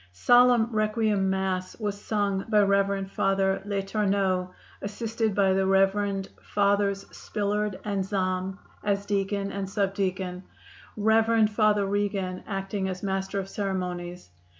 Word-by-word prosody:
Solemn 245 - +5
Requiem 215 -2 +1
Mass 190 0 -2
was 205 -2 -3
sung 200 -3 -1
by 210 -2 +5
Rev. 200 0 +1
Father 195 0 +1
L'Etourneau, 195 -2 0 0.3
assisted 220 +1 -2
by 195 -2 +3
the 190 0 +1
Rev. 195 0 +2 0.2
Fathers 200 -1 +1
Spillard 210 -1 -2
and 200 -2 -1
Zahm 185 -1 -2 0.3
as 200 -1 0
deacon 200 0 -1
and 195 -1 -4
subdeacon; 190 -2 -1 0.6
Rev. 220 +1 +4
Father 210 -1 +3
Regan, 195 -2 -2
acting 195 -1 -2
as 185 +1 -6
master 195 0 -1
of 190 - -4
ceremonies. 180 - -4
200 Hz, 120 wpm, -27 LUFS, 190-205 Hz, 0.6 s, Solemn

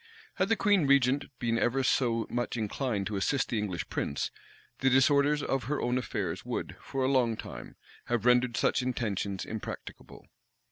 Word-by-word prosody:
Had - - +1
the 225 - +4
queen 200 -8 +3
regent 140 0 +4
been 115 -1 0
ever 130 +3 +1
so 115 -3 +2
much 120 0 -2
inclined 110 -1 -2
to 105 -1 -2
assist 130 +8 0
the 115 - 0
English 95 -4 -3
prince, 70 - -2 0.5
the 135 - +3
disorders 140 +3 +4
of 135 -4 -1
her 145 +4 -1
own 125 +1 +1
affairs 125 - -3
would, - - -4
for 135 -1 -3
a - - +2
long 125 -5 +2
time, - - -8 0.3
have 120 -1 -1
rendered 125 -1 +4
such - - +2
intentions 105 -6 -2
impracticable. 110 -1 -8
125 Hz, 170 wpm, -30 LUFS, 115-135 Hz, 0.5 s, the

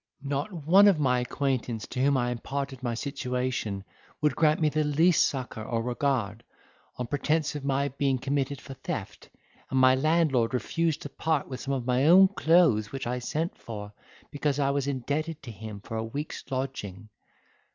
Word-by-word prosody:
Not 140 +6 -2
one 180 +4 +5
of 195 -5 +5
my 125 -3 +2
acquaintance 125 -3 -2
to 125 - -4
whom 140 0 +3
I 120 -1 0
imparted 135 +2 -4
my 120 -2 -2
situation, 125 -6 -3 0.4
would 150 -3 +1
grant 155 -1 +3
me 155 - +3
the 155 +1 +1
least 155 +4 +4
succour 125 -5 -5
or 115 +1 -2
regard, 120 -4 -1 0.5
on 125 - -2
pretence 150 +4 0
of 145 -2 -6
my 140 0 0
being 135 -1 0
committed 140 +1 -1
for 140 - -9
theft, 130 - -6 0.4
and 130 - +1
my 130 0 +6
landlord 135 -4 +2
refused 160 +4 -1
to 145 - -6
part 155 +1 -1
with 130 -1 -6
some 140 +1 -2
of 125 -3 -4
my 125 +3 +2
own 190 +3 +8
clothes 160 - +3
which 135 - -4
I 125 +1 -2
sent 155 +7 -2
for, 105 -3 -7 0.4
because 145 -1 -1
I 140 -1 +2
was 140 -1 -1
indebted 145 +4 -2
to 120 - -7
him 105 -1 -8
for 115 - -6
a 110 - -1
week's 140 +7 -5
lodging. 120 -7 -4
135 Hz, 180 wpm, -28 LUFS, 125-150 Hz, 0.5 s, own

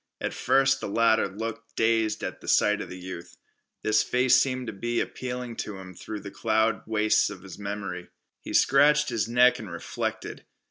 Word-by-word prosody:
At - - -3
first 135 0 +2
the - - -3
latter 110 +1 +3
looked 115 +3 -7
dazed 110 -1 +1
at - - -5
the - - -12
sight 105 0 +3
of - - -7
the 90 - -8
youth. 90 -1 -9 0.5
This 110 0 +3
face 125 0 +3
seemed 130 -2 0
to 110 - -5
be 120 +4 -2
appealing 125 -2 -4
to 105 -2 -5
him 95 -1 -10
through 105 +4 -7
the 100 - -8
cloud 110 -1 +1
wastes 110 -1 +2
of 90 - -10
his 95 0 -10
memory. 100 -3 -5 0.3
He - - -7
scratched 150 +2 +4
his 115 -2 -1
neck 125 +2 +4
and 110 -4 -8
reflected. 85 - -5
110 Hz, 185 wpm, -26 LUFS, 100-125 Hz, 0.5 s, scratched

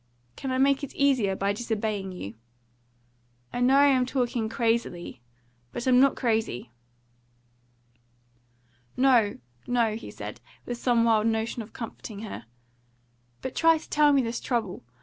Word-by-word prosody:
"Can 270 - -5
I 255 - 0
make 275 +1 +3
it 285 - -6
easier 255 -9 +2
by 200 +1 0
disobeying 215 -3 -2
you?" 110 - -7 1.2
"I - - -2
know 255 +2 +5
I 285 +1 +7
am 260 -3 +3
talking 245 -4 -1
crazily. 225 - -1 0.5
But 240 - -5
I'm 250 -1 +5
not 275 +1 +5
crazy." 220 - -1 2.3
"No, 250 -5 +4 0.3
no," 235 -3 +1
he 230 - -8
said, - - -8 0.2
with 240 -1 -5
some 240 -2 +3
wild 225 -1 +3
notion 225 +1 -1
of 215 0 -11
comforting 220 -2 -7
her; 115 - -7 1.0
"but 260 - -4
try 330 0 +4
to 315 - -12
tell 295 0 +5
me 275 -2 +4
this 230 0 -3
trouble! 225 - -2
235 Hz, 145 wpm, -27 LUFS, 215-260 Hz, 2.3 s, I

